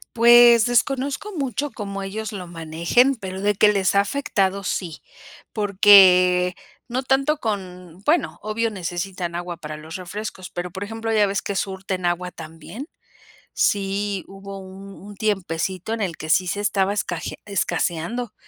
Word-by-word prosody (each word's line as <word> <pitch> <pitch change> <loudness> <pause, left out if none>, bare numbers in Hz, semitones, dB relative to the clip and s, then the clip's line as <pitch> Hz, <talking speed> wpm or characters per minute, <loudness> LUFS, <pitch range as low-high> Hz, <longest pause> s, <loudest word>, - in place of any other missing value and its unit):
Pues, 235 -1 +7
desconozco 275 - 0
mucho 275 +1 -2
cómo 200 -2 -6
ellos 210 +3 -5
lo 190 -4 -7
manejen, 170 +10 +1
pero 190 -4 -7
de 205 +1 +2
que 210 +1 +5
les 195 -3 +1
ha 200 - +4
afectado, 200 -4 -1
sí, 170 -5 -4 0.5
porque 185 -3 +6 0.3
no 255 +2 -2
tanto 275 +3 +2
con 185 - -5
bueno, 325 +4 +1
obvio 220 +2 -1
necesitan 180 -1 -4
agua 175 0 -5
para 155 -2 -7
los 155 +1 -9
refrescos, 185 0 -7
pero, 175 0 -5
por 190 +2 -5
ejemplo, 225 +2 -4
ya 210 -2 +4
ves 195 0 -2
que 200 - -3
surten 190 -2 -2
agua 180 +1 -2
también, 165 - -9 0.7
sí 200 -1 0
hubo 195 0 -9
un 195 +1 -11
un 205 0 -10
tiempecito 190 -1 -2
en 225 - -3
el 180 -5 -2
que 155 - -7
sí 185 +3 +3
se 200 +3 -2
estaba 200 -1 +1
esca 175 -5 -3 0.2
escaseando, 200 +3 -2
195 Hz, 155 wpm, -22 LUFS, 180-220 Hz, 0.7 s, Pues